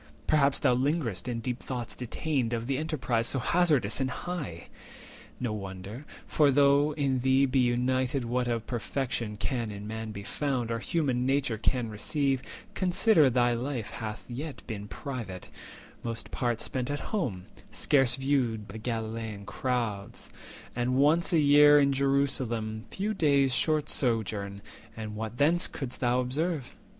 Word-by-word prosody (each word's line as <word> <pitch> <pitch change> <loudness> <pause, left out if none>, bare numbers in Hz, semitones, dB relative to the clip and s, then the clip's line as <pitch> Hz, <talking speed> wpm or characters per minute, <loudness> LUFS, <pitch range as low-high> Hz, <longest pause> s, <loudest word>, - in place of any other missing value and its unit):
Perhaps 140 -3 +3
thou 130 -3 +4
linger'st 130 - -1
in 120 -2 -2
deep 125 +1 -3
thoughts 125 -3 -5
detained 125 0 -2
Of 115 -1 -2
the 135 +1 -1
enterprise 125 -8 0
so - - +1
hazardous 140 - +2
and 130 - +1
high! 130 - -5 0.7
No 120 -4 -2
wonder; 100 +5 -7 0.2
for, 150 -2 +3
though 140 +2 +4
in 135 -4 +1
thee 130 +2 +4
be 135 0 +1
united 125 +1 +1
What 125 +1 0
of 115 -2 -1
perfection 120 -3 -3
can 120 +1 -2
in 100 0 -7
Man 110 +1 -5
be 100 -1 -7
found, 130 0 -2
230 - - 0
Or 115 - -2
human 130 -3 0
nature 135 -5 +1
can 115 0 0
receive, 135 +5 0 0.3
consider 180 - +4
Thy 120 -1 +3
life 120 -1 -3
hath 110 -1 -6
yet 140 +5 -6
been 105 -3 -6
private, 115 - -6 0.5
most 115 -1 -5
part 120 -2 -1
spent 130 0 -2
At 145 -1 -2
home, 115 - -1 0.3
scarce 135 -5 +3
viewed 125 -6 0
the 110 +4 -7
Galilean 110 -2 -4
towns, 115 -6 -3 0.4
And 125 +1 0
once 150 +7 +4
a 170 - +4
year 145 -1 +7
Jerusalem, 135 -5 0
few 205 +3 -2
days' 140 -7 +3
Short 155 +2 +2
sojourn; 105 -5 0 0.3
and 110 -1 -5
what 110 +2 -5
thence 165 +6 +3
couldst 130 -3 -6
thou 125 0 +2
observe? 145 +3 -2
125 Hz, 150 wpm, -29 LUFS, 115-140 Hz, 0.7 s, year